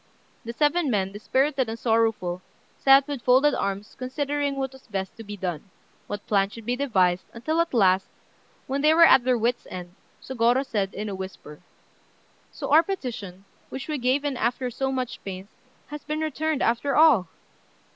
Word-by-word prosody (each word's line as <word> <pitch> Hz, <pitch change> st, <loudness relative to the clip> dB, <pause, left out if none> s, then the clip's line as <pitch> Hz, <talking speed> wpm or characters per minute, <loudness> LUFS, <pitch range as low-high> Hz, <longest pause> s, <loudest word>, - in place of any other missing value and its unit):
The 230 Hz, -, -5 dB
seven 295 Hz, +5 st, +1 dB
men, 195 Hz, -4 st, 0 dB
dispirited 260 Hz, +5 st, 0 dB
and 225 Hz, -, -4 dB
sorrowful, 225 Hz, -6 st, 0 dB, 0.3 s
sat 270 Hz, 0 st, +5 dB
with 285 Hz, -4 st, -4 dB
folded 265 Hz, +4 st, +4 dB
arms 200 Hz, +1 st, -3 dB
considering 285 Hz, +2 st, -2 dB
what 265 Hz, -1 st, -3 dB
was 265 Hz, -1 st, -17 dB
best 195 Hz, -3 st, -4 dB
to 225 Hz, -, -8 dB
be 205 Hz, -1 st, -8 dB
done, 180 Hz, -2 st, -5 dB, 0.4 s
what 205 Hz, 0 st, -6 dB
plan 195 Hz, -2 st, +2 dB
should 225 Hz, +1 st, -11 dB
be 245 Hz, +2 st, 0 dB
devised, 190 Hz, -10 st, +1 dB
until 310 Hz, +8 st, 0 dB
at 335 Hz, -, -2 dB
last, 190 Hz, -5 st, +3 dB, 0.6 s
when 275 Hz, +1 st, -2 dB
they 305 Hz, +2 st, +4 dB
were 335 Hz, 0 st, +8 dB
at 265 Hz, -, +6 dB
their 250 Hz, -1 st, +2 dB
wits' 235 Hz, +2 st, -1 dB
end, 180 Hz, -1 st, -8 dB, 0.3 s
Sôgorô 250 Hz, +1 st, +1 dB
said, 200 Hz, -6 st, -2 dB
in 210 Hz, +1 st, -4 dB
a 205 Hz, -, -4 dB
whisper 190 Hz, -6 st, -8 dB, 0.9 s
"So -, -, -6 dB
our 310 Hz, +2 st, +8 dB
petition, 245 Hz, -, -6 dB, 0.2 s
which 265 Hz, -, -7 dB
we 305 Hz, -2 st, -2 dB
gave 260 Hz, +4 st, +1 dB
in 280 Hz, -3 st, -2 dB
after 245 Hz, +2 st, -1 dB
so 265 Hz, +3 st, -2 dB
much 255 Hz, -2 st, -4 dB
pains, 190 Hz, 0 st, -7 dB, 0.4 s
has 295 Hz, 0 st, -7 dB
been 305 Hz, +1 st, -3 dB
returned 315 Hz, -1 st, -1 dB
after 240 Hz, +4 st, +1 dB
all! 300 Hz, -, +5 dB
245 Hz, 175 wpm, -25 LUFS, 200-280 Hz, 0.9 s, were